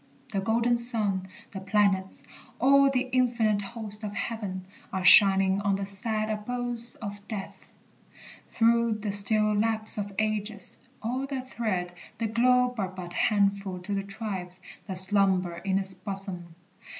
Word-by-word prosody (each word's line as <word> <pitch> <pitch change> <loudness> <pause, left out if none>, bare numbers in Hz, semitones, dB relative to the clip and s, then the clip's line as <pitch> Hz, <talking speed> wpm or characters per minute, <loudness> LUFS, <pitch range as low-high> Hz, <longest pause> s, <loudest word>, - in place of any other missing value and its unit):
The 195 - -1
golden 235 +3 +3
sun, 210 -6 +3 0.2
The 195 - -7
planets, 195 -1 0 0.3
all 275 +2 +4
the 260 -1 -1
infinite 235 -5 +1
host 210 0 -7
of 205 -1 -5
heaven, 200 -6 -5 0.3
Are 190 - -3
shining 195 +1 +6
on 200 -1 0
the 195 0 -4
sad 215 +2 -3
abodes 240 +2 -4
of 205 -2 -8
death, 200 -3 -8 0.8
Through 235 0 +2
the 210 -1 -4
still 215 +1 +5
lapse 220 0 +3
of 205 0 -4
ages. 215 -1 -2 0.2
All 255 +4 -3
that 265 -2 -6
tread 185 -6 -3 0.2
The 230 - -2
globe 250 +2 +2
are 195 - -1
but 185 -2 -9
a - - -10
handful 200 -2 0
to 185 +3 -6
the 195 - -1
tribes 195 -3 -6 0.3
That 190 -2 -3
slumber 185 -2 +3
in 190 +2 -1
its 190 -1 -1
bosom. 185 -3 -7
205 Hz, 150 wpm, -27 LUFS, 195-230 Hz, 0.8 s, shining